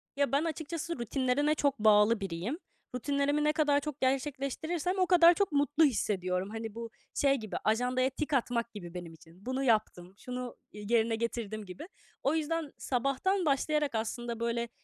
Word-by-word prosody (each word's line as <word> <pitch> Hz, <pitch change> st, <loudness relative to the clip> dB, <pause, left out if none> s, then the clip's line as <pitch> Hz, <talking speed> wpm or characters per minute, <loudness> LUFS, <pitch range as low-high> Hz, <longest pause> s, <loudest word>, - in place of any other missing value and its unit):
Ya 280 Hz, -1 st, +1 dB
ben 280 Hz, +3 st, +2 dB
açıkçası 330 Hz, -1 st, -4 dB
rutinlerine 270 Hz, +5 st, +1 dB
çok 280 Hz, -5 st, 0 dB
bağlı 215 Hz, +1 st, +5 dB
biriyim. 195 Hz, -, -4 dB, 0.4 s
Rutinlerimi 285 Hz, +3 st, 0 dB
ne 300 Hz, 0 st, +3 dB
kadar 295 Hz, -2 st, +3 dB
çok 295 Hz, -1 st, -6 dB
gerçekleştirirsem 290 Hz, +7 st, -1 dB
o 365 Hz, -, +3 dB
kadar 345 Hz, -1 st, +7 dB
çok 400 Hz, -2 st, 0 dB
mutlu 290 Hz, +2 st, +3 dB
hissediyorum. 190 Hz, -6 st, 0 dB
Hani 225 Hz, -1 st, -6 dB
bu 230 Hz, 0 st, -6 dB, 0.2 s
şey 275 Hz, -1 st, +3 dB
gibi; 215 Hz, -5 st, -6 dB
ajandaya 250 Hz, +4 st, +2 dB
tik 300 Hz, +3 st, -4 dB
atmak 235 Hz, -2 st, 0 dB
gibi 175 Hz, -4 st, -8 dB
benim 175 Hz, -2 st, -7 dB
için: 165 Hz, +5 st, -18 dB
"Bunu 260 Hz, +1 st, -1 dB
yaptım, 215 Hz, -6 st, 0 dB
şunu, 250 Hz, -1 st, -6 dB
eee, 210 Hz, 0 st, -9 dB
yerine 225 Hz, -1 st, +3 dB
getirdim." 220 Hz, -2 st, -3 dB
gibi. 185 Hz, -, -9 dB, 0.4 s
O 280 Hz, +4 st, +2 dB
yüzden 320 Hz, -1 st, -2 dB
sabahtan 275 Hz, +9 st, 0 dB
başlayarak 295 Hz, -1 st, +1 dB
aslında 230 Hz, +1 st, -3 dB
böyle 235 Hz, 0 st, -1 dB
255 Hz, 160 wpm, -31 LUFS, 220-295 Hz, 0.4 s, kadar